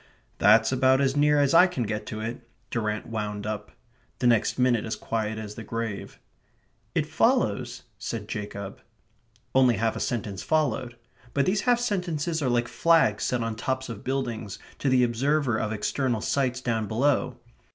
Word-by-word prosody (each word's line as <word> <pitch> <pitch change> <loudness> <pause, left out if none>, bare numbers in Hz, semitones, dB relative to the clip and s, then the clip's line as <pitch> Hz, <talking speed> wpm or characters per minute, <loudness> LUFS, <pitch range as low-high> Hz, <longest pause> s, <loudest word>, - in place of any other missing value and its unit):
"That's 110 +3 +5
about 130 0 +4
as 135 0 +1
near 150 0 +4
as 140 0 +3
I 180 +3 +8
can 155 -9 -3
get 105 -1 -4
to 110 0 -5
it," 115 +3 -4 0.3
Durrant 105 -2 -2
wound 105 -2 -4
up. 105 -1 -4 0.5
The 125 - -2
next 120 -3 +3
minute 125 -3 +2
is 110 - -3
quiet 110 -1 -3
as 105 -1 -6
the 115 - -8
grave. 115 -2 -5 0.8
"It - - +2
follows..." - - +1 0.2
said 110 -3 -5
Jacob. 100 -2 -6 0.7
Only 130 -2 +5
half 110 +2 0
a - - -4
sentence 105 -5 -3
followed; 135 -6 0 0.4
but 140 - +3
these 195 +2 +1
half 240 -1 +4
sentences 175 -8 -1
are 130 - +1
like 120 -1 +1
flags 140 - +3
set 125 -2 0
on 115 -1 -3
tops 130 +3 -3
of 110 -3 -7
buildings 120 -6 -3 0.2
to 140 - +1
the 130 -1 +4
observer 130 +1 +1
of 110 - -2
external 115 +2 -1
sights 130 -1 0
down 115 -4 -1
below. 125 +2 +1
120 Hz, 170 wpm, -26 LUFS, 110-135 Hz, 0.8 s, I